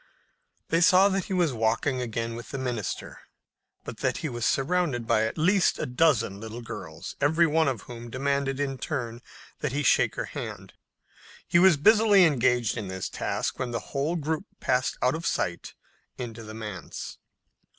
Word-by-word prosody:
They 165 - +2
saw 185 +2 +6
that 195 -2 -1
he 195 - -4
was 175 -6 +2
walking 115 +4 0
again 115 -1 -3
with 120 - -8
the 135 - -4
minister, 125 -6 -4 0.6
but - - -8
that - - -1
he - - -1
was 120 -2 -1
surrounded 140 -4 0
by 110 0 +2
at - - -6
least 185 +4 +3
a - - -2
dozen 125 -7 +2
little 115 +2 -7
girls, 80 -8 -8
every 160 +4 +4
one 160 0 +2
of 125 -7 -1
whom 120 -1 -9
demanded 135 +1 -1
in 135 -2 -2
turn 120 -5 -4 0.4
that 150 -4 -2
he 145 +1 0
shake - - +3
her - - -2
hand. - - -7 0.7
He 175 - +4
was 180 -3 +6
busily 210 +3 +6
engaged 125 -6 +2
in 105 -4 -4
this 95 0 -4
task - - -3
when 130 - -2
the 115 -1 -2
whole 145 +5 0
group 160 +3 -2
passed 125 0 0
out 125 - +3
of 165 +1 -3
sight 85 0 -2 0.4
into 115 -2 -6
the 110 -1 -9
manse. 105 -7 -7
130 Hz, 175 wpm, -27 LUFS, 115-160 Hz, 0.7 s, saw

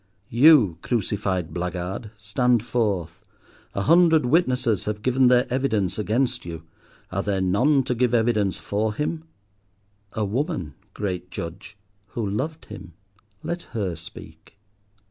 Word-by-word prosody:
You, 120 - +6
crucified 95 -6 -1
blackguard, 90 +4 -4
stand 115 +3 +1
forth. 100 -7 -1 0.5
A 100 - 0
hundred 165 - +5
witnesses 125 - +2
have 105 0 -3
given 130 0 +3
their 125 +1 +5
evidence 110 -9 0
against 125 +4 0
you. 80 -2 -7 0.5
Are 100 +1 -1
there 100 -1 -1
none 125 +10 +3
to 125 - -1
give 125 0 +1
evidence 110 -4 +1
for 105 +1 -2
him? 155 +3 -3 0.9
A 110 - -1
woman, 120 - -2 0.2
great 90 -3 -3
Judge, 90 +5 -7 0.4
who 115 -3 -1
loved 145 +11 -3
him. 85 - -10 0.5
Let 170 +1 -3 0.2
her 95 -5 -1
speak. 85 +5 -12
110 Hz, 125 wpm, -24 LUFS, 95-130 Hz, 0.9 s, You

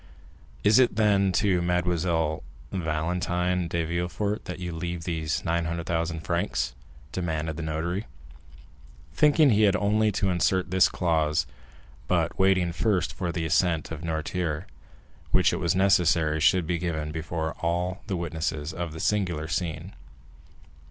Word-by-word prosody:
"Is 105 +4 +6
it, 125 - +3
then, 100 -3 +3
to 95 -3 +2
Mademoiselle 85 -2 0 0.3
Valentine 90 +1 -1
de 85 0 -1
Villefort 90 +5 -2
that 90 - -5
you 90 -1 -5
leave 85 +1 -4
these 80 -2 -2
900,000 85 0 -1
francs?" 85 +2 -1 0.4
demanded 80 -3 -2
the 85 - -5
notary, 85 +6 -3 1.1
thinking 150 -1 +5
he 105 0 +3
had 100 -3 +4
only 105 +2 +2
to 95 0 0
insert 90 +1 +1
this 95 0 +5
clause, 80 -4 +1 0.6
but - - 0
waiting 95 -3 +3
first 90 -1 0
for 90 -3 -3
the 85 -1 -2
assent 80 -1 +1
of 80 -2 -5
Noirtier, 80 +1 -2 0.6
which - - +3
it - - 0
was 85 +1 0
necessary 85 -5 +3
should 90 +2 +3
be 85 +1 -1
given 80 -3 -3
before 80 0 -3
all 90 +3 -1
the 95 -4 -1
witnesses 80 -2 -3
of 85 -2 -4
this 80 - -5
singular 90 -7 0
scene. 80 +2 -3
85 Hz, 140 wpm, -26 LUFS, 80-95 Hz, 1.1 s, Is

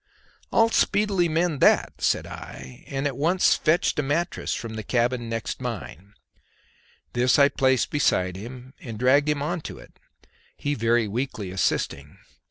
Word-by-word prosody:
"I'll 225 0 +4
speedily 200 -6 +2
mend 160 -2 0
that," - - +3
said - - +1
I, 65 -1 -10
and 135 +1 -3
at 140 -3 -1
once 170 +7 +3
fetched 160 -1 +1
a - - +4
mattress 150 +5 -2
from 115 -1 -6
the 110 - -4
cabin 120 +1 0
next 115 +2 -4
mine; 105 - -7 1.0
this 125 +1 +3
I 140 -1 +6
placed 130 -3 +1
beside 90 -10 +1
him, 125 +6 -9
and 115 -4 -8
dragged 140 +5 +3
him 145 -1 0
on 175 +3 -2
to - - -8
it, - - -16 0.6
he 145 - -2
very 115 -2 +1
weakly 110 -3 -4
assisting. 75 -5 -2
130 Hz, 155 wpm, -25 LUFS, 115-150 Hz, 1.0 s, I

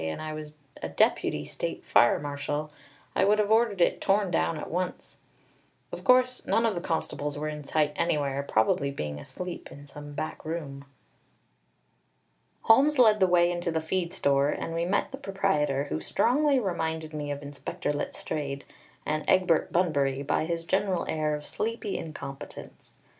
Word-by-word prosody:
and 80 0 -3
I 155 0 -4
was 155 -1 -7 0.3
a 80 - -3
deputy 75 -2 +1
state - - -5
fire 120 - +5
marshal, 145 +1 -3 0.4
I - - +3
would 210 +2 +4
have 210 0 +1
ordered 220 -4 +3
it - - +3
torn 195 -1 +2
down 165 -1 +1
at - - -6
once. 180 +2 -4 0.7
Of - - -7
course 255 0 +4
none 230 - +3
of 225 - +2
the 175 - -3
constables 150 -3 -2
were 150 +1 -3
in 150 -1 -6
sight 150 +1 +1
anywhere, 145 -5 0
probably 140 +1 +1
being 75 - -4
asleep 180 - -7
in 145 +1 -11
some 145 +1 -10
back 155 +2 -5
room! 145 -4 -5 1.8
Holmes 280 +6 +5
led 220 -4 +6
the 190 - +5
way 175 -1 +4
into 175 0 -2
the 160 -1 0
feed 170 +2 -2
store, 140 -6 +2
and 165 - -3
we 165 +1 0
met 200 +9 0
the 270 - -7
proprietor, 190 - 0
who - - -1
strongly 275 - +2
reminded 160 -6 -2
me 150 -1 -4
of 145 0 -4
Inspector 145 +1 -4
Letstrayed 145 -1 -4 0.4
and 155 0 -1
Egbert 180 -4 +3
Bunbury 140 -6 +1
by 145 - 0
his 165 0 -3
general 190 -1 +1
air 155 -1 0
of 150 0 -7
sleepy 225 -2 -3
incompetence. 140 -3 -8
160 Hz, 165 wpm, -28 LUFS, 145-190 Hz, 1.8 s, led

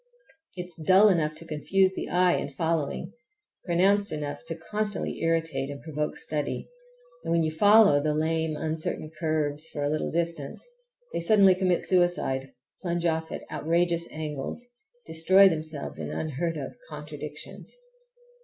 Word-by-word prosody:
It 180 - -3
is 170 -2 -10
dull 190 +6 +6
enough 155 -5 +1
to 165 +2 -10
confuse 185 +5 +1
the - - -5
eye 180 0 +3
in 140 - -3
following, 165 +4 -2 0.5
pronounced 195 +4 +3
enough 145 -1 -4
to 165 - -3
constantly 205 +5 -2
irritate, 165 -4 0
and 140 -1 -6
provoke 150 0 -4
study, 150 -2 -3 0.6
and - - -3
when 165 0 +3
you 155 - 0
follow 205 -3 +6
the 150 0 0
lame, 160 0 0
uncertain 155 0 -3
curves 155 -1 -1
for 145 - -4
a 145 - +1
little 155 +1 -1
distance 165 - -3 0.5
they - - -1
suddenly 195 +1 +6
commit 185 -1 +1
suicide—plunge 170 -1 -1
off 160 -1 0
at - - -5
outrageous 170 +1 0
angles, 155 - -5 0.4
destroy 185 +5 +5
themselves 155 -4 -3
in - - -4
unheard 160 +2 -3
of - - -5 0.2
contradictions. - - -9
165 Hz, 145 wpm, -27 LUFS, 155-180 Hz, 0.6 s, dull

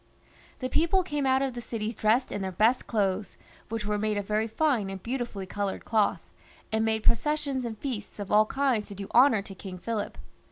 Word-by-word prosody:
The 255 - 0
people 335 +7 +2
came 295 -5 -1
out 265 +1 +3
of 270 -2 -1
the 240 - -5
cities 225 -1 -3
dressed 220 +4 +2
in 205 - -3
their 190 -1 -2
best 220 +7 +2
clothes, 200 -3 0 0.3
which 225 -1 -3
were 210 0 0
made 215 0 0
of 205 - -2
very 215 +2 0
fine 230 -4 +1
and 195 -1 -7
beautifully 235 -6 -3
coloured 200 +1 -3
cloth, 220 -3 +1 0.4
and 220 0 +2
made 220 -1 0
processions 280 +1 +1
and 225 -2 -4
feasts 225 -4 -5
of 205 -2 -6
aU 210 +1 +6
kinds 260 -3 0
to 200 - -8
do 195 0 -7
honour 240 -5 +6
to 195 - -8
King 190 -1 -8
Philip. 215 +3 -3
220 Hz, 205 wpm, -28 LUFS, 205-255 Hz, 0.4 s, aU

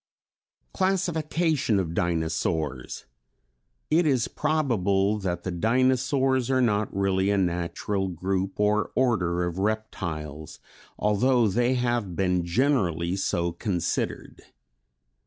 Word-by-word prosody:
Classification 165 - 0
of 85 -3 -2
Dinosaurs. 80 -5 -2 0.9
It 160 +1 +4
is 130 -5 +2
probable 105 -10 +1
that 90 -3 -3
the 95 - -3
Dinosaurs 130 - +1
are 130 -1 +2
not 105 -4 +1
really 95 0 +1
a 100 - +2
natural 95 +2 -1
group 95 +2 -2
or 105 0 +2
order 90 -9 +1
of 85 +1 -4
reptiles, 85 -8 -4 0.4
although 115 +3 +2
they 120 +5 +1
have 120 -7 -1
been 90 -1 +1
generally 90 - +1
so 85 -3 -1
considered. 90 -1 -3
100 Hz, 100 wpm, -26 LUFS, 90-125 Hz, 0.9 s, It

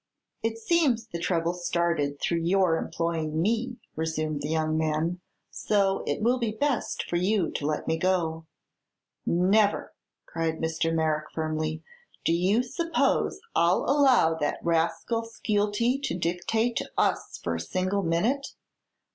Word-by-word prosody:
"It 225 0 -1
seems 255 -3 +2
the 170 -7 -6
trouble 170 -1 0
started 170 -5 -1
through 170 - 0
your 175 0 +3
employing 165 -2 -2
me," 230 +6 0 0.2
resumed 155 -2 -2
the 145 - -3
young 155 0 0
man; 160 +3 0 0.3
"so 195 -2 +1
it - - -1
will 245 +3 +3
be 235 -2 0
best 275 +1 -1
for 175 - 0
you 185 0 +1
to 145 - -3
let 150 -1 -2
me 160 - +1
go." 165 -3 0 0.8
"Never!" 200 +4 +2 0.3
cried 165 -1 -2
Mr. 160 0 -1
Merrick, 155 -1 0
firmly. 155 0 -2 0.4
"Do 165 - +3
you 190 +8 +2
suppose 330 +7 0
I'll 170 +2 +3
allow 270 - +5
that 145 - 0
rascal 170 +7 0
Skeelty 225 +2 0
to 180 -11 -2
dictate 185 +7 0
to - - -3
us - - 0
for 85 - -3
a 80 - -2
single 185 - -1
minute? 210 +12 0
175 Hz, 140 wpm, -27 LUFS, 160-220 Hz, 0.8 s, allow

